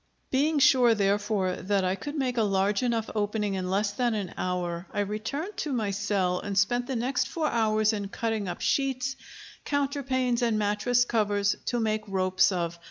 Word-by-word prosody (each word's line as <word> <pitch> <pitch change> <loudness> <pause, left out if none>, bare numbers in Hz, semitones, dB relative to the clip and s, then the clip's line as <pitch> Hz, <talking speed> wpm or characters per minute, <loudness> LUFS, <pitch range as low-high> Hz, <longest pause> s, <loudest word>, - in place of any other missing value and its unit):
Being 295 +4 +2
sure, 250 -4 +5
therefore, 200 -2 0
that 195 0 0
I 185 - +1
could 290 +10 -6
make 260 -4 -1
a - - +3
large 195 -1 +1
enough 230 -3 0
opening 210 -1 -1
in 185 -1 -3
less 200 +2 +1
than 240 +2 0
an 200 -4 -4
hour, 180 -1 -3
I 205 - -1
returned 220 - -4
to 305 -8 -2
my 215 -5 0
cell 195 -3 0
and 200 -1 -4
spent 245 +5 +2
the 265 - -2
next 250 +3 0
four 325 -2 -2
hours 215 -4 +2
in 205 -2 -3
cutting 220 0 -2
up 175 - -5
sheets, 270 -1 0 0.5
counterpanes, 270 -4 0
and 230 -3 +1
mattress 215 +4 +2
covers, 205 -3 +1
to 240 - 0
make 215 -1 0
ropes 185 0 +2
of. 170 -2 -2
215 Hz, 180 wpm, -27 LUFS, 195-245 Hz, 0.5 s, sure